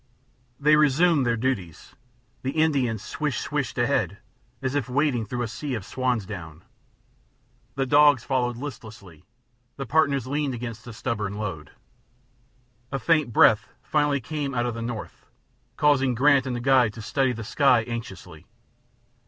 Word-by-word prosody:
They 150 +1 +5
resumed 150 -1 +3
their 115 0 +1
duties; 110 -10 -3 0.5
the 130 - -3
Indian 135 -8 +2
"swish - - -3
swished" - - -3
ahead, - - 0 0.4
as 130 0 -2
if 145 -3 -1
wading 125 -4 0
through 120 +3 -3
a - - -2
sea 135 +4 -4
of 105 -4 -6
swan's 125 -2 -1
down; 85 -4 -9 1.1
the 135 0 0
dogs 145 -1 +5
followed 125 -3 -1
listlessly; 110 - -10 0.5
the 135 - -4
partners 140 -1 +2
leaned 140 -1 -2
against 115 -1 -7
the 120 - -8
stubborn 105 -4 -3
load. 95 -8 -5 1.2
A 135 - -1
faint 155 -3 +1
breath 110 0 +5 0.2
finally 145 -2 +1
came 145 -1 -4
out 120 0 0
of 120 - -2
the 115 - -6
north, 115 -1 -7 0.5
causing 135 -4 +3
Grant 140 +1 +4
and 125 - -2
the 120 - -4
guide 125 -4 +3
to 110 - -9
study 135 +3 +1
the 115 -2 -6
sky 125 0 +3
anxiously. 95 -9 -8
125 Hz, 150 wpm, -25 LUFS, 110-140 Hz, 1.2 s, They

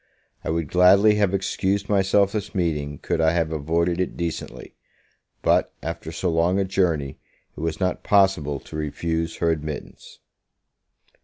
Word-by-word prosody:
I - - -4
would 80 -1 -1
gladly 95 +4 +6
have 100 -3 +2
excused 100 +1 -1
myself 100 0 +3
this 105 -1 -4
meeting, 75 -5 -1
could 85 +2 -2
I 80 0 +3
have 85 -2 0
avoided 85 +3 0
it 90 - -3
decently; 85 -2 -5 0.7
but, - - +2
after 80 0 -5
so 85 +2 -1
long 85 +3 +2
a 100 - +1
journey, 85 -8 0 0.4
it - - -10
was 80 0 -3
not 90 -1 -1
possible 95 -8 +2
to - - -11
refuse 80 +2 -2
her 85 -1 +1
admittance. 75 -2 -6
85 Hz, 150 wpm, -23 LUFS, 80-95 Hz, 0.7 s, gladly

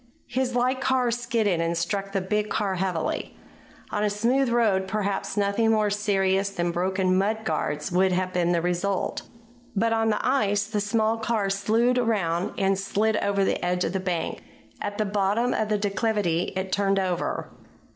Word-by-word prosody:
His 255 0 -1
light 255 +2 +1
car 260 -2 +2
skidded 230 -7 0
and 165 0 0
struck 195 +4 -2
the 195 -1 0
big 210 +3 -1
car 205 -3 0
heavily. 185 -3 -2 0.5
On 210 - -1
a 210 - +2
smooth 240 +6 +1
road 215 -5 +2
perhaps 200 0 -2
nothing 205 +3 +2
more 215 -2 +2
serious 195 -1 +1
than 175 -3 -1
broken 185 +1 +1
mudguards 195 -6 -1
would 185 +1 +3
have 185 0 -1
been 175 -1 +1
the 170 -1 +1
result. 180 +2 -1 0.5
But 225 +3 +2
on 225 0 +2
the 210 - 0
ice 205 -6 +2
the 215 -1 -2
small 220 +1 +1
car 220 -3 0
slewed 225 +5 +2
around 195 -7 0
and 195 -1 +1
slid 210 +2 +1
over 200 -1 +1
the - - -1
edge 180 0 0
of - - -2
the 190 - 0
bank. 180 -3 -2 0.4
At 205 - -4
the 215 - +1
bottom 205 +4 +1
of 215 - -1
the 210 - +2
declivity 200 -4 0
it 190 0 -3
turned 195 0 +2
over. 185 -2 -2
200 Hz, 175 wpm, -25 LUFS, 190-220 Hz, 0.5 s, would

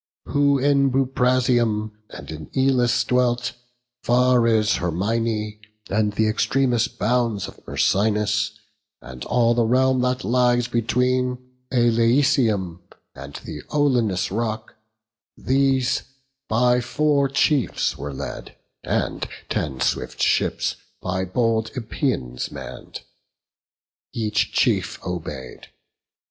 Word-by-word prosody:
Who 140 -1 +2
in 140 0 +3
Buprasium 125 -4 +1 0.2
and - - -9
in 75 -1 -8
Elis 130 -3 +3
dwelt, 125 -1 +1 0.5
Far 125 0 +3
as 110 -2 +3
Hyrmine, 105 +4 -1 0.3
and 105 0 +1
th' - - 0
extremest 120 +3 +1
bounds 115 -1 0
Of - - -13
Myrsinus; 105 0 +1 0.5
and 65 0 -9
all 120 -1 +3
the 120 0 +2
realm 130 +2 +2
that 125 0 0
lies 120 +2 +2
Between 125 +2 0 0.3
Aleisium 115 - +2 0.3
and 70 +1 -10
the 75 - -7
Olenian 125 -10 +2 0.2
rock; 110 -1 -3 0.6
These 135 -1 +1 0.5
by 125 +2 +3
four 140 +3 +1
chiefs 135 -1 +1
were 70 +1 -6
led; 65 - -7 0.3
and - - -2 0.2
ten 65 -3 -2
swift - - -1
ships, - - +1 0.2
By 95 +1 -2
bold 110 +2 0
Epeians 115 - -2
mann'd, 65 -3 -9 1.1
each 105 -3 0
chief - - +1
obey'd. 75 -7 -6
115 Hz, 105 wpm, -22 LUFS, 105-125 Hz, 1.1 s, in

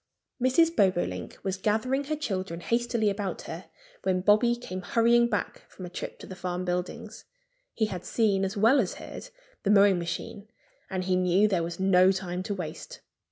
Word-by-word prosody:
Mrs. 325 +7 +3
Bobolink 185 -3 0
was 190 -1 -2
gathering 240 +8 0
her 310 +2 -1
children 190 - -3
hastily 235 +1 0
about 200 -1 -2
her - - -7 0.4
when 185 -1 0
Bobby 215 +5 +4
came 185 -6 -6
hurrying 235 +4 +3
back 205 -5 -3
from 185 - -9
a 175 - -9
trip - - -6
to - - -11
the 190 - -9
farm 180 0 -4
buildings. 180 0 -4 0.5
He 220 - +2
had 185 -4 -5
seen 205 -4 +1
as 195 +2 -2
well 230 +7 +5
as 200 -8 -1
heard - - -9 0.3
the 200 - -1
mowing 200 -2 +5
machine. 175 +4 -5 0.4
And 185 -1 -2
he 185 0 +1
knew 185 +3 +3
there 190 -5 +1
was 170 +1 -5
no 190 0 +5
time 180 -1 -3
to 200 +2 -3
waste. 160 -5 -7
195 Hz, 180 wpm, -27 LUFS, 185-225 Hz, 0.5 s, well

